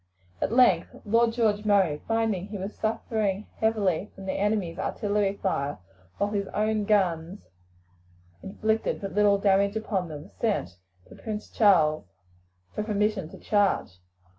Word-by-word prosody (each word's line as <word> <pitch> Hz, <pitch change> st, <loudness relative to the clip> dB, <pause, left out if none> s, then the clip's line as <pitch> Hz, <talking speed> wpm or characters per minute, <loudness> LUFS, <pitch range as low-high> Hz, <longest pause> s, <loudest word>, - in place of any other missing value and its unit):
At -, -, 0 dB
length 250 Hz, +1 st, +4 dB, 0.2 s
Lord 230 Hz, +2 st, +3 dB
George 220 Hz, -3 st, +1 dB
Murray, 195 Hz, -8 st, +2 dB
finding 225 Hz, -5 st, 0 dB
that -, -, -15 dB
he 210 Hz, -, -5 dB
was 195 Hz, +2 st, -5 dB
suffering 215 Hz, -2 st, -1 dB
heavily 210 Hz, -4 st, 0 dB
from 195 Hz, -, -10 dB
the 190 Hz, -, -1 dB
enemy's 200 Hz, -4 st, -1 dB
artillery 205 Hz, -1 st, -1 dB
fire, 145 Hz, -7 st, -1 dB, 0.4 s
while 205 Hz, +1 st, 0 dB
his 200 Hz, -2 st, -1 dB
own 215 Hz, 0 st, +1 dB
guns 185 Hz, -2 st, +1 dB, 1.0 s
inflicted 220 Hz, +3 st, -1 dB
but 195 Hz, -1 st, -6 dB
little 205 Hz, -1 st, +4 dB
damage 200 Hz, +1 st, +2 dB
upon 200 Hz, -5 st, -2 dB
them, 155 Hz, +5 st, -9 dB
sent 95 Hz, -, -1 dB, 0.3 s
to -, -, -14 dB
Prince 215 Hz, -1 st, -6 dB
Charles 160 Hz, -, +4 dB, 0.7 s
for -, -, -2 dB
permission 210 Hz, -4 st, -1 dB
to -, -, -11 dB
charge. 200 Hz, -, 0 dB
205 Hz, 140 wpm, -27 LUFS, 190-215 Hz, 1.0 s, length